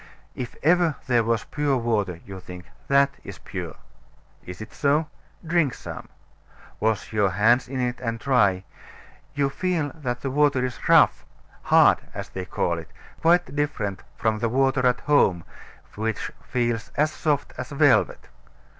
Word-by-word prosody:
If 125 -2 -6
ever 170 -1 +3
there 120 -2 +2
was 115 0 0
pure 145 -2 0
water, 105 -8 -1
you 95 -1 -8
think, 90 -1 -10 0.2
that 140 0 +4
is - - -9
pure. - - -7 0.7
Is 90 0 -8
it 110 - -9
so? 150 +2 +1 0.4
Drink 165 -6 +1
some. - - -9 0.7
Wash 110 0 -1
your 105 -2 +3
hands 110 +7 +3
in 130 0 -4
it 125 -1 -1
and 115 -2 -3
try 105 -9 +2 0.7
You 140 -1 +2
feel 170 -4 -1
that 125 -6 -4
the 135 - -3
water 140 -2 +2
is 125 -1 -5
rough, - - +5 0.4
hard - - +5 0.2
(as - - -6
they 95 -1 -6
call 85 -2 -1
it), 80 - -11 0.3
quite 175 -1 +3
different 135 -10 -2 0.2
from 110 -2 0
the 115 - 0
water 135 +1 +2
at 125 0 +1
home, 95 - +3 0.5
which 110 0 -3
feels 120 -3 -2
as 155 +1 +2
soft 145 -3 -1
as - - -5
velvet. 140 -6 +2
125 Hz, 155 wpm, -24 LUFS, 110-145 Hz, 0.7 s, rough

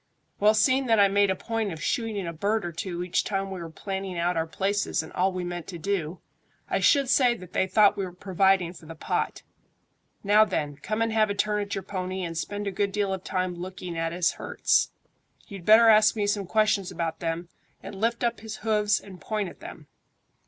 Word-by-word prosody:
"Well, 210 +1 +5
seeing 260 +4 +3
that 225 -2 +4
I 200 - +7
made 200 0 +3
a 190 - +1
point 225 0 -3
of 160 - -7
shooting 215 0 -2
a 170 - -4
bird 205 +5 -1
or 175 - -3
two 175 +1 -4
each 180 - 0
time 195 -1 -2
we 190 - -5
were 165 -1 -7
planning 190 +2 -5
out 175 +1 0
our 165 0 -1
places 200 +4 -1
and - - -12
all 190 +2 +1
we 185 -1 -4
meant 175 -1 -5
to 175 - -6
do, 175 -1 -2 0.5
I - - 0
should 280 -3 +4
say 250 -2 +4
that 185 -5 -12
they 190 - +1
thought 205 +2 +5
we 195 - -1
were 180 - -7
providing 185 -1 +1
for 165 -3 -14
the 165 - -8
pot. - - -2 0.8
Now 210 +1 +6
then, 145 -9 -2
come 215 +6 -2
and 225 -1 -1
have 215 -1 +3
a 200 - -1
turn 210 0 0
at 205 0 -4
your 195 - -4
pony, 185 -1 -4
and 165 -1 -4
spend 205 +5 -4
a 200 - -1
good 200 +1 -1
deal 200 -1 0
of 190 -1 -5
time 185 -1 -2
looking 180 0 -7
at 165 0 -1
his 175 +1 +1
hurts. - - +1 0.6
You'd 195 -4 -9
better 225 +2 +7
ask 215 0 +6
me 210 -2 0
some 205 -2 -1
questions 215 -2 +2
about 165 -1 -3
them, 170 +1 -3 0.3
and - - -8
lift 235 +2 0
up 235 -1 0
his 220 -1 -7
hoofs 210 -1 +2
and 185 -3 -13
point 210 -4 -2
at - - -15
them." - - -10
195 Hz, 225 wpm, -26 LUFS, 175-215 Hz, 0.8 s, I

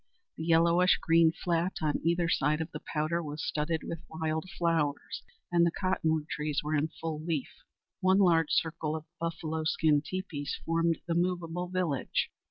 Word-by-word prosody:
The 160 - -5
yellowish 170 +2 +4
green 165 -1 +4
flat 170 +2 -1
on 150 -1 +1
either 170 +1 +2
side 150 -1 +2
of 160 +1 -4
the - - -7
Powder 155 +2 0
was 150 -1 -5
studded 155 +1 -1
with 165 - -5
wild 160 +2 -2
flowers, 160 -4 0 0.3
and 170 -1 +4
the 170 - +4
cottonwood 160 -4 0
trees 150 -2 -2
were 150 +1 -2
in 150 +1 +2
full 155 -2 -4
leaf. 160 -5 -2 0.5
One 190 +1 +4
large 170 -5 +4
circle 160 -1 0
of 155 -1 -6
buffalo 160 -1 -3
skin 155 -2 +3
teepees 160 -6 -4
formed 165 0 +2
the 170 - -1
movable 175 0 -1
village. 180 -7 -1
165 Hz, 165 wpm, -30 LUFS, 155-170 Hz, 0.5 s, yellowish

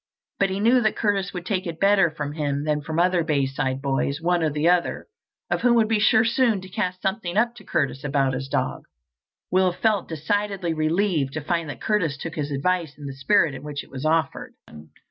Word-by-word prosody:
But 195 - +3
he 190 +1 -2
knew 240 +4 +4
that 215 -2 +1
Curtis 200 -3 0
would 175 -2 -6
take 190 -2 -2
it 165 -1 -6
better 195 -3 +4
from 150 -2 -5
him 145 -2 -2
than 150 -1 0
from 155 +2 -5
the 170 - +4
other 180 -2 +2
Bayside 135 -3 -1
boys, 140 +1 0
one 175 +1 +1
or 160 - +2
the 150 +2 0
other 175 0 +1 0.5
of - - 0
whom 245 -1 +4
would 225 -2 +4
be 220 -1 +1
sure 220 +2 +4
soon 230 -2 +2
to 185 - -11
cast 185 0 -3
something 190 -2 -2
up 235 +2 +2
to - - -12
Curtis 135 -2 -1
about 140 -2 +1
his 135 +1 -4
dog. - - -2 0.7
Will 185 0 +3
felt 205 +1 0
decidedly 185 +2 -1
relieved 155 -2 0
to 155 - -3
find 165 +1 -2
that 145 - -7
Curtis 165 -9 0
took 160 +3 -6
his 150 -2 -3
advice 160 +2 -1
in 145 - -10
the 135 - -5
spirit 155 +2 +2
in 130 - -8
which 145 -1 -5
it - - -19
was 135 0 -6
offered. 155 -2 0
165 Hz, 220 wpm, -24 LUFS, 145-195 Hz, 0.7 s, knew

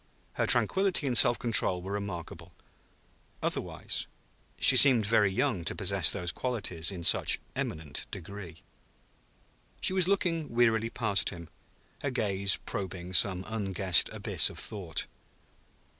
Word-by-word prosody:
Her - - -2
tranquillity 190 -5 +2
and 130 -3 -1
self 120 0 +7
control 95 -7 +1
were 95 - -7
remarkable, 90 -4 -7 0.9
otherwise; - - -2 0.5
she 135 - +5
seemed 125 -4 +5
very 105 -2 +2
young 115 -4 -2
to - - -2
possess - - +1
those 90 -1 -2
qualities 95 -9 -3
in 90 -4 -7
such - - +3 0.2
eminent 80 -2 -5
degree. 95 -3 -10 1.2
She - - 0
was 185 -2 +1
looking 170 -6 -1
wearily 115 -1 +1
past 100 -9 0
him, 85 -2 -11 0.5
her 140 - -3
gaze 100 -6 +1
probing 95 -2 -7
some 95 0 +3
unguessed 95 -5 +2
abyss - - +1
of - - -13
thought. 95 -7 -1
100 Hz, 130 wpm, -28 LUFS, 90-120 Hz, 1.2 s, self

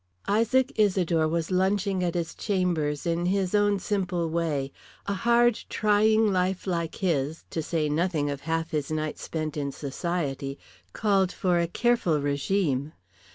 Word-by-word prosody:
Isaac 230 +5 +2
Isidore 180 -6 +3
was 165 +2 -2
lunching 190 0 +1
at 175 -1 -1
his 170 -2 -2
chambers 175 -8 -1
in 170 +1 0
his 190 0 0
own 205 -1 +3
simple 180 -4 -1
way. 155 -5 -1 0.3
A 200 - -1
hard 235 +2 +3
trying 215 0 +3
life 185 0 0
like 170 -3 -2
his, 160 -4 -1
to 165 - -2
say 155 -1 -1
nothing 155 0 0
of 140 -1 -5
half 165 +1 -2
his 150 -3 -2
nights 155 -1 -3
spent 155 -1 -4
in 140 -2 -2
society, 140 -2 -3 0.3
called 195 -3 +2
for 180 -2 +1
a 170 - +1
careful 205 -5 +1
regime. 145 0 0
175 Hz, 150 wpm, -27 LUFS, 155-195 Hz, 0.3 s, Isidore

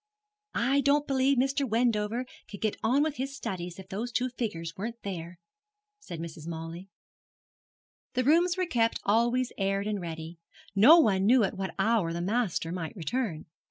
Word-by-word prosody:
'I 270 +4 +2
don't 285 +1 +3
believe 270 0 +2
Mr. 270 +3 +1
Wendover 230 +1 +1 0.2
could 200 - -8
get 215 -2 0
on 265 +6 +3
with 305 -1 -2
his 270 +2 -3
studies 180 -6 -5
if 190 - -11
those 225 +5 -4
two 250 +1 0
figures 170 -10 -4
weren't 230 +4 -5
there,' 175 -3 -6 0.6
said 170 - -8
Mrs. 165 -1 -7
Mawley. 165 +3 -6 1.3
The 255 - +2
rooms 345 +6 +3
were 370 - +1
kept 230 -9 +1
always 235 +4 +2
aired 195 +1 0
and 210 -2 -2
ready 165 0 -7 0.3
no 230 +12 +8
one 200 - +3
knew 245 0 +6
at 195 - -1
what 190 0 -4
hour 200 -4 +2
the 170 - -3
master 190 -4 -1
might 170 -3 -5
return. 185 - -3
215 Hz, 165 wpm, -29 LUFS, 180-255 Hz, 1.3 s, no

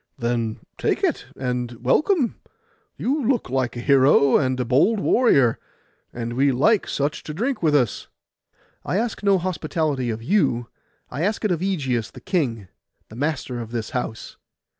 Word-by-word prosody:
'Then 120 -2 -1 0.2
take - - 0
it, - - 0
and 125 -2 -2
welcome. 245 - +1 0.6
You 280 +3 -1
look 240 - 0
like 130 -2 -1
a - - -4
hero 140 0 +5
and 130 -1 +1
a 125 - 0
bold 145 - +3
warrior; 140 - +3 0.5
and 120 0 -5
we 135 +3 +3
like 190 - +2
such 145 +3 -2
to 150 - -7
drink 245 - -1
with 155 -3 +3
us.' 125 -7 0 0.8
'I 185 - -1
ask 230 +1 -2
no 200 -1 +4
hospitality 155 -7 -2
of 115 0 -4
you; 120 - +1 0.4
I 140 - -4
ask 210 +5 0
it 210 - +1
of 170 - 0
Ægeus 140 - -1
the - - -11
king, 120 - -1 0.4
the 110 - -12
master 135 -2 -2
of 115 -2 -6
this 115 -2 -4
house. 115 -3 -5
135 Hz, 160 wpm, -23 LUFS, 120-185 Hz, 0.8 s, hero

